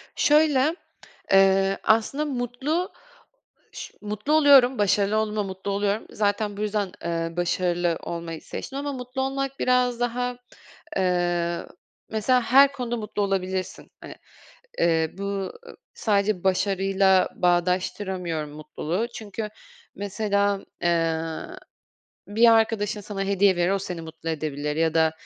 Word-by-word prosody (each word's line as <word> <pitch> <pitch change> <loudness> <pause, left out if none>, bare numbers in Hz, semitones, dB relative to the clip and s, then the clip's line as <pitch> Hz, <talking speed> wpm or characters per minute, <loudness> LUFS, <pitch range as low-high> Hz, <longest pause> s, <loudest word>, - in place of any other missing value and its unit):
Şöyle, 300 0 +3 0.6
eee, 195 0 +4
aslında 225 +7 +2
mutlu 270 +6 -2 0.8
ş - - -9
mutlu 210 +7 -2
oluyorum, 275 -4 +6
başarılı 205 +1 +2
olduğumda 215 -1 0
mutlu 190 +1 -5
oluyorum. 205 +2 -1
Zaten 205 0 -1
bu - - -4
yüzden, 210 -2 -1
eee, 165 0 -2
başarılı 175 -1 0
olmayı 170 -1 -5
seçtim 270 - -7
ama 285 0 -3
mutlu 250 0 -5
olmak 270 0 -2
biraz 250 -1 +2
daha, 245 +1 -1 0.6
eee, 175 -2 0 0.4
mesela 245 +4 +2
her 275 +4 +6
konuda 245 -3 -3
mutlu 210 -2 -3
olabilirsin, 190 -1 -2
hani. - - -9 0.7
Eee, 160 -2 +2
bu, 200 - -5
ııı, 200 - -5 0.2
sadece 200 -3 0
başarıyla 190 0 +2
bağdaştıramıyorum 180 -2 0
mutluluğu. 155 +7 -3
Çünkü 215 0 -6 0.5
mesela, 200 0 -1 0.2
eee, 165 -2 +1 1.1
bir 230 +3 +5
arkadaşın 220 -2 +1
sana 200 -1 -5
hediye 195 -1 +3
verir, 175 +1 +2
o 195 - +1
seni 180 -3 -5
mutlu 160 0 -8
edebilir 150 -1 -3
ya 160 0 +1
da, 160 -1 +3
200 Hz, 120 wpm, -25 LUFS, 180-235 Hz, 1.1 s, oluyorum